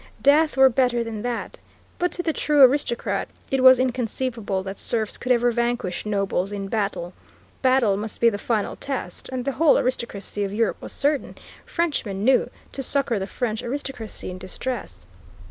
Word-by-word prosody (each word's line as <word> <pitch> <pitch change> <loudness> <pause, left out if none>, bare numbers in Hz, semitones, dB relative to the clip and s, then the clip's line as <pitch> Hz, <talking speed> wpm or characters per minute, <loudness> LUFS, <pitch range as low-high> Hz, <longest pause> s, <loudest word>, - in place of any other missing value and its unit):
Death 300 +1 +4
were 265 0 +8
better 245 -2 +2
than 225 -2 -5
that. 240 0 -4 0.4
But 355 0 +1
to 350 - -3
the 320 - 0
true 295 -2 +4
aristocrat 260 -2 +2 0.2
it 270 -1 +2
was 260 0 +9
inconceivable 235 -5 -2
that 195 +1 -6
serfs 220 -3 -2
could 255 - -2
ever 240 0 +4
vanquish 235 -5 -1
nobles 200 -2 0
in 200 -1 -4
battle. 200 -5 -2 0.5
Battle 255 -6 +3
must 215 +1 -6
be 235 - +5
the 205 - -4
final 215 -3 -1
test, 265 -10 -5
and 255 -1 -4
the 275 - +1
whole 310 +3 +4
aristocracy 220 -5 -2
of 195 - -2
Europe 225 -1 0
was - - -5
certain, 290 0 0 0.3
Frenchmen 255 - -1
knew, 260 +3 +4 0.2
to 275 - -4
succor 260 -4 +1
the 190 - -3
French 225 -1 -2
aristocracy 245 -6 -5
in 180 - -8
distress. 240 +7 -5
240 Hz, 170 wpm, -24 LUFS, 205-265 Hz, 0.5 s, was